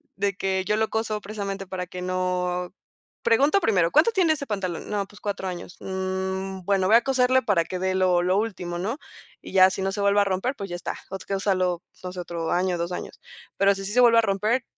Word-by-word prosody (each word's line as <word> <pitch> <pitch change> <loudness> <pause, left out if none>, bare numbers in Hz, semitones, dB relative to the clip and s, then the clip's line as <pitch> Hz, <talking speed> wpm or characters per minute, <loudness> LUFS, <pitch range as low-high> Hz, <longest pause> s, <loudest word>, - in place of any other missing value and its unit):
de 200 0 0
que 190 0 -1
yo 210 - +1
lo 220 0 +1
coso 220 -1 -2
precisamente 195 -1 -5
para 185 -1 -4
que 180 0 -8
no, 180 0 -1 0.5
pregunto 280 - +4
primero, 180 - +2
¿cuánto 315 +10 +5
tiene 365 -7 +3
ese 280 -2 -6
pantalón? 190 -5 -3
No, 205 -1 -1
pues, 205 +1 -17
4 200 -2 -3
años, 180 0 -6
mm, 190 0 -3
bueno, 195 -2 +2
voy 220 - +6
a 235 - +6
coserlo 260 -1 +3
para 185 -7 +2
que 185 - -4
dé 185 +1 0
lo 185 -2 +3
lo 185 +2 +2
último, 180 -5 -3
¿no?, 220 +9 -2 0.4
y - - -10
ya 185 0 +7
si 190 0 -4
no 195 - 0
se 200 +1 -3
vuelve 200 0 +4
a - - +5
romper, 200 +7 -1
pues, 200 -5 -6
ya 175 - -4
está, - - -5
o 195 - -3
sea, 195 - -1
úsalo 185 -3 0 0.2
pues 180 0 -7
otro 170 -2 -4
año, 180 0 +1
2 170 +1 -2
años, - - -7 0.4
pero 200 0 +4
si 195 - -6
sí 195 - -4
se 250 - +3
vuelve 235 -1 +6
a 230 - +7
romper, 215 +4 0
195 Hz, 230 wpm, -25 LUFS, 185-215 Hz, 0.5 s, ya